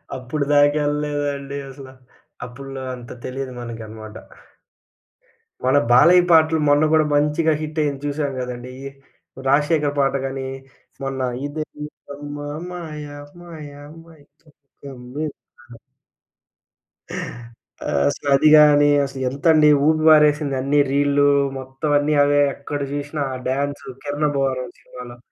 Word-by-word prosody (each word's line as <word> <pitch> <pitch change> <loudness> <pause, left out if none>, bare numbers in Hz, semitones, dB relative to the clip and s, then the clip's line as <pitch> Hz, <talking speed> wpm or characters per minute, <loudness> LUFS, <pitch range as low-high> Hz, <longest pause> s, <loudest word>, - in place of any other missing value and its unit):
అప్పుడు 130 +3 -3
దాకా 145 +1 +4
ఎళ్ళలేదండి 145 -1 -3
అసల. 135 0 -11 0.6
అప్పట్లో 135 +2 -9
అంత 120 -1 -11
తెలీదు 130 0 -5
మనకనమాట. 110 -2 -9 1.5
మన 130 +2 +4
'బాలయ్య' 175 +8 +6
పాటలు 160 0 +5
మొన్న 145 +1 +4
గూడా 155 -1 +4
మంచిగా 150 +2 +2
హిట్ 155 +1 -4
అయ్యింది 140 -2 -2
చూసాం 145 -1 -2
కదండీ. 125 0 -6
ఈ - - -5 0.6
'రాజశేఖర్' 145 +1 +2
పాట 135 0 +2
గాని 135 0 -4 0.6
మొన్న 135 -1 -3 0.2
ఇదేమీటమ్మా 145 -1 -7 0.2
మాయ 155 -4 -7 0.4
మాయ 160 -4 -10 0.3
మైకం 155 -1 -22 0.3
క‌మ్మిందా. 130 -2 -9 2.1
ఆహ్, 75 - -1
అసలది 140 - +2
గాని 145 -1 +6 0.2
అసలెంతండీ 140 +4 +2 0.2
ఊపి 155 0 +2
పారేసింది. 150 -2 +5
అన్నీ 140 +2 +2
రీల్లు 145 0 +3 0.3
మొత్తం 130 +3 -5
అన్నీ 150 +1 0
అవే 145 0 +3
ఎక్కడ 145 +1 -5
చూసినా 145 +1 -3
ఆ - - -4
డాన్సు 140 +2 -3
'కిరణ్ 145 +1 -1
అబ్బువరం' 130 -3 -2
సినిమాలో. 125 -1 -11
145 Hz, 110 wpm, -21 LUFS, 135-150 Hz, 2.1 s, బాలయ్య